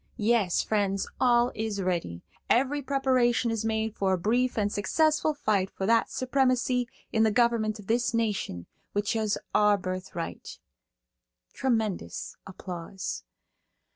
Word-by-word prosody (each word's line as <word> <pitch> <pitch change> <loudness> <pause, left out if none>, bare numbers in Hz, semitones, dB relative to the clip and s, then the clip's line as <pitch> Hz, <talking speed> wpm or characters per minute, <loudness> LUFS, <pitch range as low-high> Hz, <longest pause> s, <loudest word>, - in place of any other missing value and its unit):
Yes, 215 -5 +2
friends, 200 -2 0
all 240 -1 +4
is 215 -2 -3
ready; 170 - -2 0.3
every 275 +4 +2
preparation 255 -3 +2
is 225 -1 -2
made 220 -1 -1
for 190 -1 +1
a - - +2
brief 240 +8 +1
and 205 -1 +1
successful 310 +8 +2
fight 205 -9 0
for 190 - -4
that 230 +2 +3
supremacy 255 -1 +1 0.3
in 220 - +3
the 220 - +5
government 230 -1 +2
of 205 - -12
this 240 +4 +1
nation 210 - -1 0.3
which 205 +2 0
is 215 -2 0 0.2
our 210 -1 +4
birthright. 185 -2 -5 1.0
(Tremendous 225 -7 -2
applause.) 180 - -6
220 Hz, 130 wpm, -28 LUFS, 195-245 Hz, 1.0 s, the